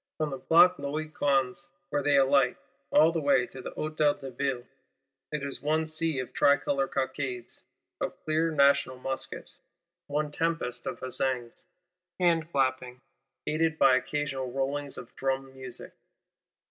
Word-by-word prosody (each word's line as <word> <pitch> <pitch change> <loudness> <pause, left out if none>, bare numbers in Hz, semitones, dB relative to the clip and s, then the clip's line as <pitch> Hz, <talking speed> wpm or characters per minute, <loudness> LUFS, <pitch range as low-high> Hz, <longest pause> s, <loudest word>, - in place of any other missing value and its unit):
From 155 -2 -1
the 135 - -5
Place 170 +5 +6
Louis 150 +2 -3
Quinze, 135 -3 0 0.2
where 145 - +1
they 145 0 +3
alight, 135 -1 +4 0.3
all 155 +3 +5
the 165 -1 -1
way 140 -4 +3
to 130 - -10
the - - -6
Hôtel 155 -1 0
de 135 -1 -7
Ville, 125 -1 -2 0.7
it 150 -2 -3
is 140 -1 -4
one 155 +2 +1
sea 155 -1 -1
of 130 -1 -4
Tricolor 140 -1 +3
cockades, 130 -2 -3 0.4
of - - -3
clear 155 +1 +2
National 140 -3 +3
muskets; 135 +1 -5 0.5
one 150 +1 -1
tempest 145 -7 -2
of - - -5
huzzaings, 130 -2 -3 0.5
hand 170 -2 +2
clappings, 130 -2 0 0.4
aided 160 +1 +1
by 135 -3 +6
"occasional 135 -1 -2
rollings" 140 +2 -2
of 120 - -10
drum 135 0 -2
music. 130 -2 -6
140 Hz, 145 wpm, -29 LUFS, 130-155 Hz, 0.7 s, Place